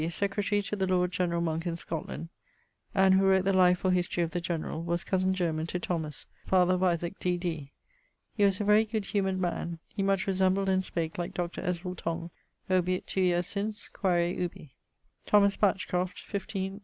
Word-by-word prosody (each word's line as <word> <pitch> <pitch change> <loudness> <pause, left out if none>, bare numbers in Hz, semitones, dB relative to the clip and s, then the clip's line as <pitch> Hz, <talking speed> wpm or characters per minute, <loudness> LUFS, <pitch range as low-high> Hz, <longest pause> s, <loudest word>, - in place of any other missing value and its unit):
secretary 200 +3 0
to 210 +1 -3
the 190 -2 0
lord 180 -1 +2
generall 170 -2 0
Monke 165 +1 -1
in 170 -1 -2
Scotland, 165 0 -5 0.7
and 190 -1 +5
who 190 +1 +4
wrote 190 -1 +4
the 195 - +3
life 180 -1 +4
or 185 - +4
history 175 -1 +1
of 165 - -3
the 175 - -2
generall, 165 -1 -3
was 170 +1 -1
cosen 190 0 +1
german 165 -4 -1
to 180 - -3
Thomas 160 -5 -3 0.2
(father 185 -1 +4
of 185 - 0
Isaac, 175 0 0
D.D.). 175 -5 -2 0.6
He 210 - +1
was 195 -2 +3
a - - 0
very 210 +1 +5
good 215 -2 -3
humoured 195 -2 0
man. 170 -1 -2
He - - -4
much 195 -1 +1
resembled 190 0 +2
and 190 0 +2
spake 165 -2 -3
like 175 - -4
Dr. 175 -1 -3
Ezerel 180 +1 -3
Tong. 170 0 -4 0.4
Obiit 185 0 +1
2 190 - -1
yeares 175 -1 +2
since: 210 +3 -4
quaere 175 -2 +1
ubi. 165 -6 -5 0.5
=Thomas 200 -1 +5
Batchcroft= 185 -2 0
(15.. 195 -1 -4
180 Hz, 185 wpm, -29 LUFS, 170-195 Hz, 0.7 s, and